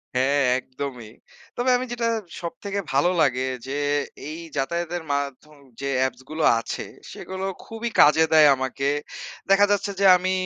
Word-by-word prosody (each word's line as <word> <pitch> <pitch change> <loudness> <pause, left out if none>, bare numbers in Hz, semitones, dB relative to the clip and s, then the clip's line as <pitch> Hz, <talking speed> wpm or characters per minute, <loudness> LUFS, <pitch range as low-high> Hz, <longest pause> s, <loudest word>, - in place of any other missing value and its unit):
হ্যাঁ, 140 +3 +2 0.2
একদমই। 130 -4 -7 0.5
তবে 245 +1 +1
আমি 255 - -3
যেটা 235 -1 -1 0.3
সবথেকে 200 +4 -4
ভালো 145 +6 +3
লাগে 130 -3 +2 0.3
যে 135 - -4 0.6
এই 155 - -6 0.2
যাতায়াতের 170 +4 -2
মাধ্যম 140 +2 -4 0.3
যে 140 - -2
অ্যাপসগুলো 130 +4 -2 0.2
আছে - - -5 0.3
সেগুলো 190 0 -6 0.2
খুবই 225 +1 -4
কাজে 150 +2 +6
দেয় 155 -1 +8
আমাকে। 130 +1 -3 0.6
দেখা 200 +1 +6
যাচ্ছে 200 0 0
যে 200 - +3
আমি 185 +1 -1
155 Hz, 140 wpm, -24 LUFS, 135-190 Hz, 0.6 s, দেয়